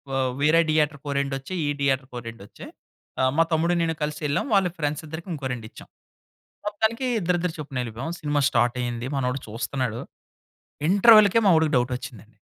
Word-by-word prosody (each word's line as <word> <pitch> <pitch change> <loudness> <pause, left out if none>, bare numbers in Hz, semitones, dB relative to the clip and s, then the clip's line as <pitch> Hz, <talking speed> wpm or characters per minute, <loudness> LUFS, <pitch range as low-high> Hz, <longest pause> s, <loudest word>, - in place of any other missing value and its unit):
ఆహ్, 130 -1 +1
వేరే 155 +3 +5
దియేటర్‌కి 150 -2 +1
ఓ - - -1
రెండొచ్చాయి, 140 +6 -3
ఈ - - 0
దియేటర్‌కి 135 -1 0
ఓ - - -9
రెండొచ్చాయి. 105 -3 -12 0.7
మా 165 - +6
తమ్ముడు 165 +2 +2
నేను 165 -1 0
కలిసి 150 0 -3
ఎళ్ళాం. 145 - 0
వాళ్ళ 195 -2 +4
ఫ్రెండ్సిద్దరికి 155 +2 -4
ఇంకో 145 -4 -6
రెండిచ్చాం. 110 -3 -10 0.8
మొత్తానికి 220 +4 -1
ఇద్దరిద్దరు 175 -2 0
చొప్పున 145 -3 -6
ఎళ్ళిపోయాం. 120 +7 -5
సినిమా 145 -1 0
స్టార్ట్ 120 -1 +1
అయింది. 120 0 -3
మనోడు 130 0 -1
చూస్తున్నాడు. 115 +1 -3 0.9
ఇంటర్వల్‌కే 215 +1 +7
మా - - +6
వాడికి 160 -1 +2
డౌట్ 125 +1 +1
వచ్చిందండి. 115 -4 -11
145 Hz, 155 wpm, -24 LUFS, 125-165 Hz, 0.9 s, ఇంటర్వల్‌కే